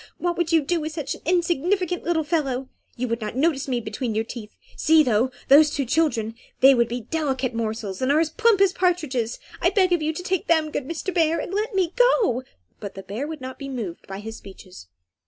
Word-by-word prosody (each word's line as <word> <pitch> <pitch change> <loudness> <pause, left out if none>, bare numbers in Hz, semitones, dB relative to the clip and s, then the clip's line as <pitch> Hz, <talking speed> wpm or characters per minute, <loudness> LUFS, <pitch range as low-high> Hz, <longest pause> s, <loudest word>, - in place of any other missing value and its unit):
What 350 0 -1
would 345 -1 -1
you 325 -1 +5
do 335 +4 0
with 310 +1 -4
such 300 -4 -3
an - - -11
insignificant 355 +1 +1
little 330 -1 +1
fellow? 275 -5 -1 0.3
You 250 +1 -1
would 230 0 -2
not 215 +1 -4
notice 285 0 +1
me 250 -2 0
between 220 +1 -4
your 220 - +1
teeth. 225 -2 -9 0.2
See, 320 0 +5
though, 240 -1 +2 0.2
those 300 +2 +7
two 280 -2 -2
children, 235 -6 +1 0.3
they 270 +1 +8
would 235 -2 +3
be 240 +1 -4
delicate 265 -1 -2
morsels, 220 -3 -3
and 260 +2 +2
are 300 - +4
as 320 -1 +1
plump 445 +3 +3
as 390 -2 +4
partridges; 305 -11 0 0.2
I - - +4
beg 370 -4 +3
of 345 - +1
you 310 +1 0
to 320 +3 -6
take 375 -1 -1
them, 315 -2 +2
good 270 - -3
Mr. 335 +4 -4
Bear, 330 -2 +2
and - - -5
let 425 +2 -1
me 370 -3 +1
go." 485 - +3 0.4
But 200 -2 -7
the 195 - -8
bear 215 +9 -4
would 310 -3 -7
not 260 0 -7
be 275 -1 -6
moved 225 -10 -6
by 195 +1 -6
his 225 +1 -7
speeches. 185 - -13
290 Hz, 230 wpm, -24 LUFS, 235-335 Hz, 0.4 s, they